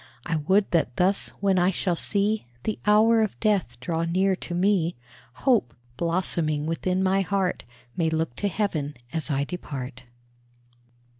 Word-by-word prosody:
I 165 -2 0
would 190 +7 +2
that 160 -8 +1
thus, 190 +2 +1
when 195 -2 +3
I 175 +1 +4
shall 180 -1 0
see 205 - 0 0.2
The 215 - -2
hour 220 +2 +5
of 215 -3 -1
death 195 - 0
draw 165 +6 -2
near 185 +3 +2
to 175 - -5
me, 180 -2 +2 0.5
Hope, 220 - +3 0.2
blossoming 165 -2 0
within 180 +3 0
my 190 +1 +3
heart, 190 - -1 0.3
May 165 -2 +1
look 160 -5 -1
to 205 - 0
heaven 165 -7 -2 0.2
as 160 -1 -2
I 140 -1 +1
depart. 135 -6 -6
180 Hz, 150 wpm, -25 LUFS, 160-200 Hz, 0.5 s, hour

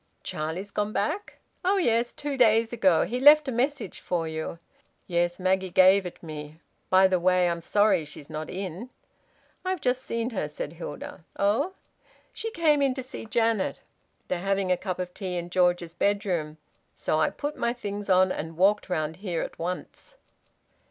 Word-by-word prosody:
"Charlie's 165 +6 -4
gone 210 +1 -1
back?" 360 - -2 0.3
"Oh 385 +2 +3
yes. 235 -8 +2
Two 290 -1 -4
days 230 -2 +4
ago. 190 -8 +3
He 245 - -3
left 295 +2 +7
a - - 0
message 260 -2 -1
for 170 -2 -2
you." 160 +1 -4 0.5
"Yes. 175 0 0
Maggie 190 0 +1
gave 185 +1 +5
it 175 - -11
me. 155 -1 -8 0.3
By 190 0 +6
the 185 -1 +1
way, 180 0 +3
I'm 170 -1 -1
sorry 205 -1 +3
she's 145 -1 -9
not 155 0 -6
in." 190 +5 -5 0.7
"I've 370 -1 -1
just 255 0 0
seen 230 0 -2
her," 185 -9 -2
said 150 +1 -5
Hilda. 170 -1 -8
"Oh!" 210 - +1 0.6
"She 450 - -4
came 315 -7 +2
in 270 -2 +2
to 260 - -4
see 245 -3 -8
Janet. 225 -2 +1 0.5
They're 180 - -1
having 195 0 0
a - - +5
cup 185 0 -4
of 180 -1 -4
tea 185 -3 -4
in 175 0 -5
George's 175 -2 +2
bedroom. 175 -5 0 0.4
So 155 - 0
I 155 - +3
put 290 +1 -4
my 235 - 0
things 205 -4 -5
on 185 0 +5
and 160 -1 -5
walked 195 +2 +3
round 160 -2 -2
here 185 -4 -2
at - - -8
once." 180 - -6
190 Hz, 175 wpm, -27 LUFS, 175-235 Hz, 0.7 s, left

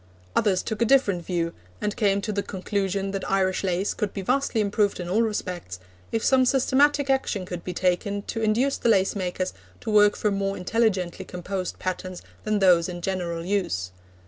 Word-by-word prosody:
Others 195 -4 +2
took 220 0 -4
a - - +5
different 210 -9 +3
view, 170 -1 -1 0.3
and 210 - -2
came 200 -2 +2
to 215 - -3
the 200 -1 -1
conclusion 195 0 -2
that 195 -1 -4
Irish 190 -1 +1
lace 185 +1 0
could 210 -2 -3
be 195 - -3
vastly 255 +1 +1
improved 205 -1 +1
in 175 - -4
all 200 +6 +2
respects, 180 - -3 0.3
if 225 - -1
some 265 -1 +5
systematic 275 +2 +3
action 265 -8 0
could 180 -1 -6
be 180 - -4
taken 185 +3 0
to 225 - -4
induce 235 +6 +2
the 235 - +1
lace 195 -2 +3
makers 185 -1 -2 0.3
to - - -4
work 210 -1 +5
from 210 -2 0
more 195 0 -1
intelligently 185 -2 0
composed 185 +1 -4
patterns 185 0 -4 0.2
than 215 0 +1
those 180 -3 +4
in 175 -1 -6
general 170 -3 -2
use. 175 - -1
195 Hz, 185 wpm, -25 LUFS, 180-215 Hz, 0.3 s, a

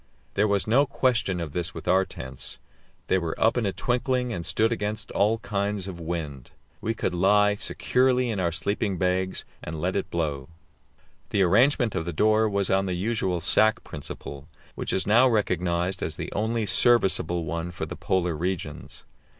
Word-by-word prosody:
There 105 +2 +2
was 100 -1 +1
no 135 +6 +3
question 120 -10 +1
of 80 -4 -5
this 85 -1 -2
with 80 - -8
our 95 +2 +4
tents. 65 -5 -9 0.5
They 95 - +2
were 85 -2 -4
up 110 - +3
in 120 -4 0
a - - 0
twinkling, 125 +2 -1
and 85 -5 -4
stood 110 +6 +1
against 105 -1 -3
all 105 +3 +2
kinds 100 -2 -2
of 90 -3 -7
wind; 80 -6 -5 0.3
we 115 +1 -1
could 90 - -2
lie 105 +3 +4
securely 125 +3 +1
in 105 - -2
our 85 -2 +1
sleeping 100 +3 -1
bags, 95 +1 -1 0.2
and 75 0 -5
let 90 +4 -1
it 100 - -2
blow. 75 -5 -2 0.8
The 100 - +2
arrangement 115 +5 +3
of 80 - -2
the 85 - -4
door 110 +5 +3
was 100 -1 0
on 95 0 +2
the 90 - -1
usual 95 -3 -1
sack 110 +6 +3
principle, 70 -1 -8 0.3
which - - -3
is 95 - 0
now 120 +5 +5
recognized 90 -4 0
as 80 - -2
the - - -5
only 110 +2 -1
serviceable 95 -7 +2
one 85 +2 -3
for 90 - -5
the - - -7
Polar 90 -3 0
regions. 80 -3 -5
95 Hz, 180 wpm, -26 LUFS, 85-110 Hz, 0.8 s, now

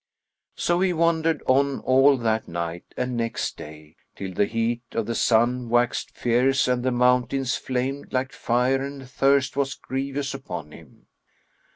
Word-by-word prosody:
So 175 0 +1
he 185 -1 +2
wandered 165 -2 +1
on 135 +1 +2
all 135 +2 +5
that 110 -2 -1
night 85 0 -4
and 125 0 -2
next 115 -1 -2
day, 75 +1 -12 0.2
till 95 -1 -6
the 100 +3 +2
heat 115 +2 -1
of 115 - -1
the 115 - -2
sun 120 +2 +2
waxed 120 +1 +1
fierce 125 +3 +2
and 125 -1 +1
the 130 - +1
mountains 125 +1 +2
flamed 130 +2 -3
like 130 0 -1
fire 125 +3 +1
and 140 -1 -6
thirst 135 +1 +2
was 135 -2 -1
grievous 135 +1 -3
upon 90 - -7
him. - - -16
125 Hz, 155 wpm, -24 LUFS, 115-135 Hz, 0.2 s, all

